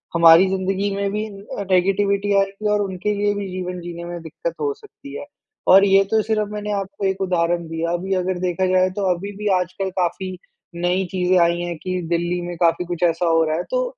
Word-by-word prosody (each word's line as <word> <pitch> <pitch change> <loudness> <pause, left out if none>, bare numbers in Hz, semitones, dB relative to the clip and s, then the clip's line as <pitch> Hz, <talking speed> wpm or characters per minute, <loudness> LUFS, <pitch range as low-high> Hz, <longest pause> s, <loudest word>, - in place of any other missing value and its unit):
हमारी 170 +2 +7
ज़िन्दगी 195 +1 -1
में 200 0 -1
भी 210 +1 -2
अ, 200 0 -7
नेगेटिविटी 200 +2 +2
आएगी 195 +2 -1
और 205 - +2
उनके 195 +1 -2
लिए 205 0 +1
भी 200 -1 -4
जीवन 180 -1 -4
जीने 170 0 -7
में 175 0 -6
दिक्कत - - -5
हो 430 -1 0
सकती 395 -10 -13
है, - - -7 0.4
और 195 +2 +8
ये 195 0 +5
तो 220 - +4
सिर्फ़ 215 -2 -1
मैंने 210 0 -4
आपको 195 0 -3
एक 190 0 -1
उदाहरण 175 -2 0
दिया। 165 +1 -2
अभी 190 +3 -2
अगर 185 0 -1
देखा 180 +1 0
जाए 185 0 +3
तो 205 - -1
अभी 200 +4 -6
भी 210 - -3
आजकल 185 +2 -3
काफ़ी 185 +1 -2 0.5
नई 185 +2 +1
चीज़ें 185 0 +2
आई 170 0 +3
हैं 175 -1 -4
कि 185 -1 -2
दिल्ली 175 +1 0
में 175 - -5
काफ़ी 170 +1 +2
कुछ 175 0 -4
ऐसा 170 0 +2
हो 165 0 +4
रहा 155 0 0
है। 175 - -2
तो - - +1
185 Hz, 215 wpm, -21 LUFS, 175-200 Hz, 0.5 s, और